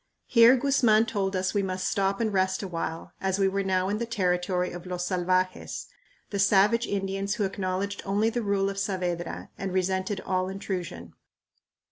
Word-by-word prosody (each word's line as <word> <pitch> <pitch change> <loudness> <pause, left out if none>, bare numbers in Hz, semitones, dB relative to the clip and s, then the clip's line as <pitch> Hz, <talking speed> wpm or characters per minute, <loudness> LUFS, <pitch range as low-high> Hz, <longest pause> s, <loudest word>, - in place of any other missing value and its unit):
Here 235 +1 +6
Guzman 240 -5 +4
told 195 -4 -1
us 185 0 0
we 205 - +2
must 185 -1 -2
stop 195 0 0
and 220 -3 0
rest 190 +1 +1
a - - -3
while, 165 -2 -4
as 190 0 0
we 195 -1 +3
were 195 +1 0
now 190 -1 +1
in 205 +2 -1
the 235 - -2
territory 180 -4 0
of 175 +1 -8
los 180 -1 -3
salvajes, 185 0 -1 0.5
the 200 - -2
savage 205 +4 +4
Indians 195 0 -2
who 215 - -1
acknowledged 195 +1 -2
only 205 +3 +1
the 240 - -1
rule 200 -2 +1
of 195 - -5
Saavedra 180 -3 -3
and 195 -1 -3
resented 190 +1 0
all 185 0 -1
intrusion. 180 - -5
195 Hz, 175 wpm, -27 LUFS, 185-200 Hz, 0.5 s, Here